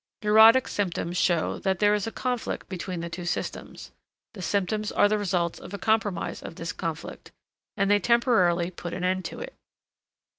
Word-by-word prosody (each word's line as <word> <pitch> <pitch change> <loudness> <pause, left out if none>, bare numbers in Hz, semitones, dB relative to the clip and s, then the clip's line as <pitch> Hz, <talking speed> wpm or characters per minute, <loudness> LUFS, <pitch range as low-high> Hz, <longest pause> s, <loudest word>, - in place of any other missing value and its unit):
Neurotic 220 +4 +7
symptoms 175 -3 -2
show 175 -2 +1
that 190 -2 0
there 205 +2 +3
is 210 0 -1
a - - -3
conflict 250 -1 -3
between 180 -1 -5
the 170 - -5
two 175 +2 -6
systems; 175 - -5 0.4
the 200 - -9
symptoms 205 +3 -1
are - - +4
the 210 0 0
results 180 -4 -1
of 200 - -8
a - - -5
compromise 215 -3 -1
of - - -9
this 165 0 -5
conflict, 160 -2 -6 0.5
and 200 0 +2
they 205 - +5
temporarily 185 -6 +2
put 175 -1 -6
an 180 - -5
end 185 +1 0
to - - -6
it. - - -7
190 Hz, 180 wpm, -26 LUFS, 175-210 Hz, 0.5 s, Neurotic